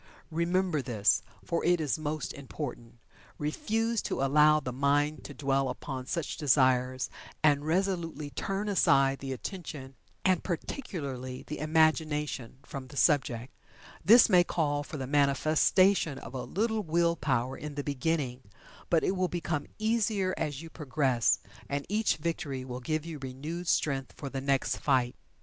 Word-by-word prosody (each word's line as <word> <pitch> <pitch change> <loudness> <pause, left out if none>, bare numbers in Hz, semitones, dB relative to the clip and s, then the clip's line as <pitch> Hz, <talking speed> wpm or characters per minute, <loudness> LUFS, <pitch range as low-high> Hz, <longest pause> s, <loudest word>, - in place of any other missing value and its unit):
Remember 170 -1 +1
this, 105 -6 +2 0.2
for 170 - -1
it 175 0 +3
is 155 0 -1
most 155 -1 -3
important. 130 -4 -7 0.4
Refuse 225 +9 -1
to - - -2
allow 150 +2 +5
the 130 -4 -5
mind 145 +3 +1
to - - -7
dwell 135 -2 +1
upon 130 -2 -5
such 165 -1 -3
desires, 130 -3 +3 0.4
and 145 -1 +3
resolutely 165 -4 -1
turn 195 +5 -3
aside 135 -9 +3
the 135 -1 -5
attention, 140 -2 -6 0.3
and, 185 -2 +3
particularly, 140 - -4
the 150 - -6
imagination, 155 -5 +1
from 135 -1 -7
the 140 +2 -11
subject. 135 -5 +2 0.5
This 230 +5 +8
may 180 -1 +6
call 145 -4 0
for 150 +1 -7
the 135 - -3
manifestation 150 +4 +3
of 120 -1 -9
a 130 - -4
little 220 +2 0
will 170 -1 +2
power 130 -4 0
in 150 -1 -7
the 145 - -3
beginning, 140 -2 -1 0.5
but 165 -2 +3
it 190 - +1
will 185 0 +1
become 170 -4 -3
easier 215 -4 +1
as 150 -1 -3
you 165 - -10
progress, 135 -6 +1 0.3
and 140 0 -2
each 215 +2 +1
victory 145 -5 -3
will 125 -1 -5
give 155 +4 -2
you 165 -3 -6
renewed 145 +7 -6
strength 135 -5 0
for 140 -2 -7
the 135 - -3
next 135 -1 +1
fight. 130 -3 +1
150 Hz, 150 wpm, -30 LUFS, 135-170 Hz, 0.5 s, This